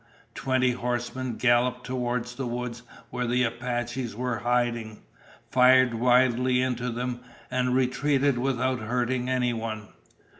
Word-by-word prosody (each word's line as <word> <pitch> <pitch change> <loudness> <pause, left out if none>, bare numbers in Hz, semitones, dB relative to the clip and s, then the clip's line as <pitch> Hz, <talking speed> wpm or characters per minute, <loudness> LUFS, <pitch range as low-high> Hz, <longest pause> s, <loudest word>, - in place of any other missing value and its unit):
Twenty 130 -1 +1
horsemen 125 0 -3
galloped 125 +1 +2
toward 125 -2 -2
the 125 +1 -5
woods 120 0 -4 0.3
where 125 0 -2
the 125 +1 +2
Apaches 120 0 -3
were 125 0 -2
hiding, 120 -2 -1 0.5
fired 130 -1 +5
wildly 125 +1 +3
into 125 -1 -1
them, 120 +1 -3 0.3
and 125 0 +1
retreated 135 +1 +1
without 130 0 0
hurting 125 +2 -1
anyone. 115 -4 -2
125 Hz, 115 wpm, -26 LUFS, 120-130 Hz, 0.5 s, fired